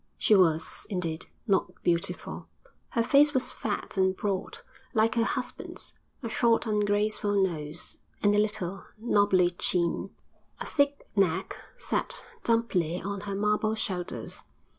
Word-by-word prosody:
She -, -, +3 dB
was, 165 Hz, -5 st, +3 dB
indeed, 175 Hz, -4 st, -3 dB, 0.2 s
not 195 Hz, -5 st, +2 dB
beautiful: 170 Hz, -1 st, -1 dB, 0.4 s
her 230 Hz, -, +1 dB
face 290 Hz, +4 st, +5 dB
was 260 Hz, -, +1 dB
fat 205 Hz, -1 st, -4 dB
and 190 Hz, 0 st, +2 dB
broad, 195 Hz, -2 st, -2 dB, 0.4 s
like 220 Hz, +1 st, +4 dB
her 230 Hz, -, +2 dB
husband's; 250 Hz, +2 st, -4 dB, 0.3 s
a -, -, -2 dB
short, 230 Hz, +1 st, +2 dB
ungraceful 210 Hz, -1 st, +1 dB
nose, 160 Hz, -4 st, -2 dB, 0.2 s
and 205 Hz, 0 st, +5 dB
a 205 Hz, -, +4 dB
little, 210 Hz, -3 st, -1 dB
nobbly 205 Hz, -5 st, +3 dB
chin; 175 Hz, -1 st, +1 dB, 0.5 s
a -, -, -4 dB
thick 285 Hz, -1 st, +1 dB
neck, 190 Hz, -2 st, +1 dB, 0.2 s
set -, -, -1 dB, 0.2 s
dumpily 190 Hz, -8 st, +1 dB
on 200 Hz, 0 st, -4 dB
her 195 Hz, -, -2 dB
marble 210 Hz, +2 st, +1 dB
shoulders. 180 Hz, -, -4 dB
205 Hz, 130 wpm, -28 LUFS, 180-220 Hz, 0.5 s, face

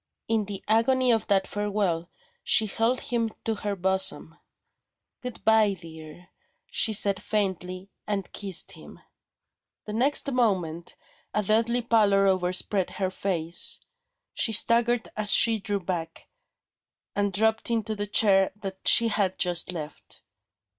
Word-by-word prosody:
In 220 Hz, -2 st, 0 dB
the 200 Hz, -1 st, -7 dB
agony 250 Hz, +3 st, +2 dB
of 225 Hz, -1 st, 0 dB
that 195 Hz, -1 st, +2 dB
farewell, 200 Hz, -5 st, -2 dB, 0.3 s
she 220 Hz, -, +3 dB
held 225 Hz, +4 st, 0 dB
him 230 Hz, -2 st, -2 dB, 0.2 s
to 225 Hz, -, 0 dB
her 205 Hz, -1 st, -4 dB
bosom. 190 Hz, -3 st, -1 dB, 0.9 s
"Goodbye, 220 Hz, -4 st, +1 dB
dear," 160 Hz, +1 st, -13 dB, 0.4 s
she 225 Hz, -, +2 dB
said 200 Hz, -2 st, +2 dB
faintly 190 Hz, -2 st, -3 dB, 0.2 s
and 200 Hz, -3 st, -4 dB
kissed 195 Hz, -4 st, -1 dB
him. -, -, -13 dB, 0.9 s
The 210 Hz, -, -6 dB
next 275 Hz, +4 st, +1 dB
moment, 185 Hz, -9 st, -1 dB, 0.4 s
a 210 Hz, -, +1 dB
deadly 230 Hz, +4 st, +1 dB
pallor 205 Hz, -4 st, +3 dB
overspread 185 Hz, 0 st, 0 dB
her 190 Hz, -2 st, -2 dB
face. 175 Hz, -3 st, +1 dB, 0.5 s
She 225 Hz, -, +1 dB
staggered 235 Hz, +2 st, +2 dB
as 215 Hz, -1 st, +3 dB
she 225 Hz, -1 st, +5 dB
drew 205 Hz, 0 st, -3 dB
back, 165 Hz, -3 st, -5 dB, 0.9 s
and 205 Hz, 0 st, 0 dB
dropped 220 Hz, +4 st, +1 dB
into 220 Hz, -2 st, -1 dB
the 205 Hz, 0 st, -4 dB
chair 195 Hz, -2 st, +3 dB
that 195 Hz, -2 st, -7 dB
she 230 Hz, 0 st, +5 dB
had 200 Hz, -3 st, 0 dB
just 175 Hz, 0 st, 0 dB
left. 155 Hz, -4 st, -8 dB
205 Hz, 130 wpm, -26 LUFS, 185-225 Hz, 0.9 s, she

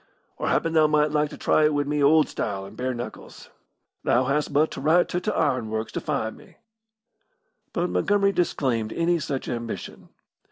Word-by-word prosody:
Or -, -, -3 dB
happen 165 Hz, -, +1 dB
thou 155 Hz, -1 st, +5 dB
might 150 Hz, 0 st, +2 dB
like 150 Hz, -1 st, +1 dB
to -, -, -10 dB
try 155 Hz, -, +2 dB
it 150 Hz, -1 st, +2 dB
wi' 145 Hz, -, +2 dB
me 145 Hz, +1 st, -1 dB
old 155 Hz, +2 st, +5 dB
style 95 Hz, -2 st, -4 dB
and 100 Hz, -, -12 dB
bare 130 Hz, 0 st, -2 dB
knuckles. 120 Hz, +1 st, -9 dB, 0.5 s
Thou 125 Hz, -, +3 dB
hast 140 Hz, +3 st, 0 dB
but 150 Hz, +2 st, +2 dB
to -, -, -6 dB
write 160 Hz, +5 st, +4 dB
to 180 Hz, -, -2 dB
t' 215 Hz, -, -2 dB
ironworks 110 Hz, -, -1 dB
to -, -, -4 dB
find 110 Hz, 0 st, -2 dB
me." -, -, -18 dB, 1.1 s
But 175 Hz, 0 st, -1 dB
Montgomery 200 Hz, -1 st, +2 dB
disclaimed 130 Hz, -, 0 dB
any 170 Hz, 0 st, +1 dB
such 140 Hz, -3 st, -4 dB
ambition. 115 Hz, -1 st, -6 dB
150 Hz, 185 wpm, -25 LUFS, 125-160 Hz, 1.1 s, thou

